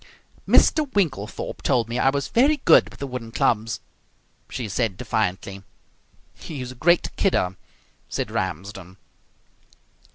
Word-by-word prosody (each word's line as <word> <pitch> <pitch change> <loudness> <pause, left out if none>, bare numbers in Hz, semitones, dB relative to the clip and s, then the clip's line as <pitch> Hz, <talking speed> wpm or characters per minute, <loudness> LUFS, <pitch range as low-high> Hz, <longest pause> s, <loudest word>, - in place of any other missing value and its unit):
"Mr 300 -4 +4
Winklethorpe 140 - -2
told 120 -5 +1
me 120 +2 -2
I 135 - +4
was 140 +1 -1
very 280 +6 +3
good - - +6
with - - -15
the 140 - -4
wooden 125 -4 -6
clubs," 110 -1 0 0.7
she 120 - -4
said 105 -1 -1
defiantly. 100 -4 -2 0.7
"He's 130 -5 -7
a - - -9
great 170 +7 +2
kidder," 95 - +1 0.5
said - - -3
Ramsden. 95 +1 -4
120 Hz, 125 wpm, -23 LUFS, 100-140 Hz, 0.7 s, good